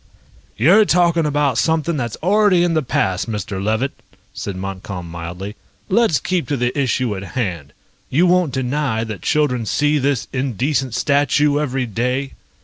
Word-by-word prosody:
"You're 175 - +6
talking 170 -4 +2
about 145 -4 +1
something 160 0 +1
that's 120 -5 -3
already 195 -1 +4
in 175 -1 +1
the 160 - +2
past, 95 -6 -1
Mr. 105 -2 -4
Levitt," 110 +6 0 0.4
said 100 - -5
Montcalm 95 -1 -6
mildly. 85 +5 -7 0.3
"Let's 195 -7 +3
keep 180 -2 -1
to 145 - -1
the 125 0 -1
issue 130 -5 0
at 95 - -6 0.2
hand. 85 - -3 0.4
You 165 +7 +3
won't 180 -4 +3
deny 130 -3 -1
that 110 -6 -6
children 145 - +1
see 150 +4 +2
this 135 -2 0
indecent 130 0 -1
statue 145 +2 +2
every 135 -3 -1
day?" 125 +4 -2
135 Hz, 150 wpm, -19 LUFS, 110-150 Hz, 0.4 s, You're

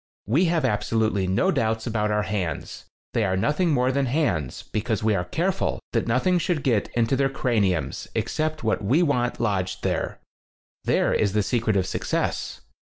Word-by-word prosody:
We 140 - +3
have 165 -4 +1
absolutely 110 -3 +1
no 95 +1 +2
doubts 110 0 0
about 110 -2 0
our 105 0 +1
hands. 95 -7 -4 0.3
They 115 - +2
are 95 -2 +1
nothing 150 - +1
more 130 -3 +2
than 135 0 0
hands, 95 - -1
because 110 -1 -2
we 110 0 +3
are 90 -3 0
careful 180 - -1
that 115 -1 0
nothing 150 +10 +2
should 165 -3 -1
get 115 -6 +1
into 120 +2 +2
their 135 +1 +2
crani 110 -9 +1
ums 70 -4 -5
except 155 0 -1
what 110 -1 0
we 135 - +3
want 125 -6 0
lodged 95 -5 -1
there. - - -1 0.7
There - - +2
is 100 -2 +1
the 105 -1 +2
secret 110 -2 +1
of 95 - +1
success. - - -2
115 Hz, 175 wpm, -24 LUFS, 100-140 Hz, 0.7 s, We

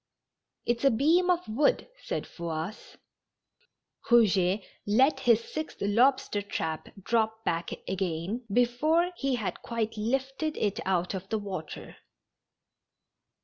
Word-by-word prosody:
It's 240 +1 0
a 275 - +7
beam 320 +10 +3
of 360 0 +1
wood," 275 +7 +2 0.2
said - - -2
Fouasse. 170 +3 -6 1.1
Eouget 200 -4 +4 0.2
let 260 +9 +4
his 235 -2 +4
sixth 310 +5 -6
lobster 230 +1 +2
trap 160 -5 -4
drop 220 0 0
back 165 0 -1 0.2
again 190 +4 -2
before 295 - +2
he 275 -2 0
had 215 -5 -4
quite 225 -1 -2
lifted 270 +7 -1
it 205 -2 0
out 180 -1 +1
of 190 0 -6
the 220 - 0
water. 190 -7 -7
225 Hz, 115 wpm, -28 LUFS, 190-265 Hz, 1.1 s, a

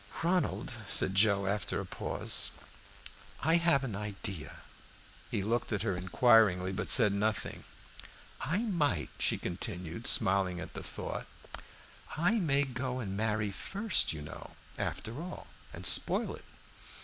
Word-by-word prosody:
"Ronald," 175 -2 0
said 95 - +4
Joe, 100 0 +4
after 100 +2 -1
a - - -4
pause, - - +1 0.9
"I 160 +3 +4
have 170 -5 +3
an 115 -7 -4
idea." 100 -5 -5 0.7
He 100 - -2
looked 115 +4 -1
at 105 -1 -1
her 100 -5 0
inquiringly, 95 0 +4
but 95 - -3
said 105 -5 +6
nothing. 105 +1 -2 0.8
"I 195 +8 -1
might," 170 -10 0
she - - +3
continued, 90 +3 -4
smiling 95 -2 +4
at - - -8
the - - -6
thought - - -5 0.9
"I 180 +8 +2
may 145 -6 +2
go 130 -1 -3
and 100 -6 -4
marry 105 -1 -1
first, 200 - +1
you 75 -2 -6
know, 75 - -10 0.2
after 120 +7 -4
all, 180 +2 -7 0.3
and - - -7
spoil - - +2
it." - - -15
110 Hz, 135 wpm, -31 LUFS, 95-140 Hz, 0.9 s, said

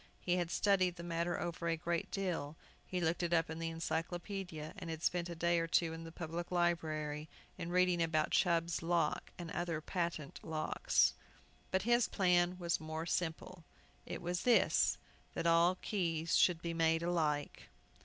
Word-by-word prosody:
He 180 0 0
had 175 -2 -1
studied 185 -1 +2
the 170 - -8
matter 170 0 -1
over 170 0 -3
a 165 0 +1
great 170 0 -2
deal. 170 -7 -2 0.3
He 180 - -2
looked 170 0 0
it 175 -1 0
up 165 -1 +2
in 160 - -5
the 165 0 -2
Encyclopædia, 165 0 -4
and 180 -4 -7
had 160 0 -5
spent 175 -1 0
a 170 - -5
day 170 +1 +2
or 165 - -1
two 165 0 +2
in 165 0 -7
the 165 - -8
Public 170 +1 -5
Library, 155 -4 -1 0.3
in 170 - -5
reading 180 -1 +3
about 155 -2 +1
Chubb's 170 -2 +2
Lock 165 -2 0
and 170 -2 -6
other 170 -3 -2
patent 170 -3 -3
locks. 160 - +1 0.6
But 190 - +1
his 240 +1 +3
plan 180 -2 +2
was 170 -2 0
more 160 +1 -4
simple. 170 +1 -3 0.4
It - - -5
was 175 +1 -1
this: 245 -2 +4 0.4
that - - -2
all 170 +2 +5
keys 165 -5 0
should 170 -2 +4
be 170 -1 -2
made 165 0 +2
alike! 155 -4 -1
170 Hz, 175 wpm, -35 LUFS, 165-175 Hz, 0.6 s, all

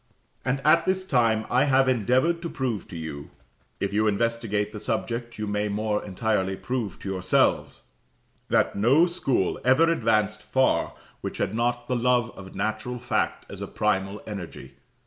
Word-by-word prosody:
And 135 +2 -1
at 165 +2 +5
this 190 0 +1
time 115 -8 +2
I 125 +3 +3
have 135 -1 +4
endeavoured 130 - +2
to 170 - -4
prove 125 -9 -3
to 85 - -8
you 80 -3 -6 0.5
if 100 0 -2
you 110 +1 +2
investigate 105 -1 0
the 105 - -7
subject 120 +1 -3
you 110 - -3
may 105 0 -1
more 105 +1 -1
entirely 95 -1 -1
prove 120 -6 -3
to 100 - -5
yourselves 95 -2 +1 0.7
that - - +2
no 130 +11 +5
school 135 - 0
ever 150 +7 +4
advanced 110 -6 +1
far 130 +5 +1 0.3
which - - -5
had - - -1
not 120 +1 -1
the 125 - 0
love 120 -1 +2
of 95 -1 -11
natural 110 +3 -2
fact 120 -2 -1
as - - -9
a - - -4
primal 100 -1 -1
energy. 90 -10 -8
115 Hz, 165 wpm, -26 LUFS, 105-130 Hz, 0.7 s, at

